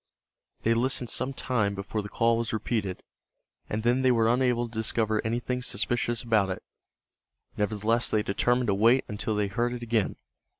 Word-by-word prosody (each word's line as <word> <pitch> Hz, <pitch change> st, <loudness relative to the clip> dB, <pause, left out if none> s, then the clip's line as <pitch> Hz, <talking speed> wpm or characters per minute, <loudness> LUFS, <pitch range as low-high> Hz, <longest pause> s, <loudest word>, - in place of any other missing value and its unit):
They 115 Hz, -, +3 dB
listened 125 Hz, 0 st, +2 dB
some 130 Hz, +1 st, -1 dB
time 110 Hz, -7 st, -1 dB
before 100 Hz, +2 st, -3 dB
the 105 Hz, -, -8 dB
call 115 Hz, +2 st, +2 dB
was 115 Hz, -1 st, -2 dB
repeated, 105 Hz, -3 st, -2 dB, 0.7 s
and 110 Hz, +1 st, -2 dB
then 120 Hz, +2 st, +2 dB
they 130 Hz, -1 st, +4 dB
were 115 Hz, -1 st, +3 dB
unable 125 Hz, -1 st, +1 dB
to 115 Hz, -, -16 dB
discover 110 Hz, -1 st, 0 dB
anything 120 Hz, +2 st, -2 dB
suspicious 120 Hz, 0 st, -1 dB
about 110 Hz, -5 st, +2 dB
it. 95 Hz, -, -5 dB, 0.9 s
Nevertheless 110 Hz, +3 st, 0 dB
they 105 Hz, -1 st, +1 dB
determined 120 Hz, +4 st, +1 dB
to -, -, +3 dB
wait 115 Hz, +6 st, +4 dB
until 105 Hz, 0 st, -2 dB
they 105 Hz, 0 st, +1 dB
heard 120 Hz, +5 st, -1 dB
it 120 Hz, -1 st, -6 dB
again. 115 Hz, -3 st, 0 dB
115 Hz, 170 wpm, -27 LUFS, 105-120 Hz, 0.9 s, they